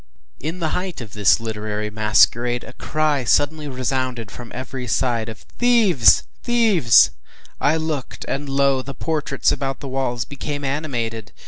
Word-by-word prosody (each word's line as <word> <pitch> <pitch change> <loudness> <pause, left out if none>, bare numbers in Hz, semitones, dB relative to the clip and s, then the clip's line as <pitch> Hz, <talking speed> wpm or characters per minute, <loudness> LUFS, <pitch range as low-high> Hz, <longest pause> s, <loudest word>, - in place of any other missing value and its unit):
In 160 +5 -4
the 165 -3 -1
height 180 +1 -3
of 115 -5 -9
this 105 +2 +4
literary 105 -1 -4
masquerade, 120 +3 +3
a - - -11
cry 150 -3 0
suddenly 150 +6 +1
resounded 130 -4 -2
from 120 -1 -10
every 130 0 -6
side, 115 +1 0
of 110 -1 -10
“Thieves! 225 - +5 0.2
thieves!” 215 - +5 0.5
I 155 +2 +2
looked, 155 -4 -4
and 140 +1 -3
lo! 135 -1 +2
the 140 +1 -8
portraits 150 -3 0
about 135 -1 -2
the 140 - -7
walls 130 -3 -2
became 145 0 -5
animated! 120 -6 -3
135 Hz, 145 wpm, -21 LUFS, 115-150 Hz, 0.5 s, Thieves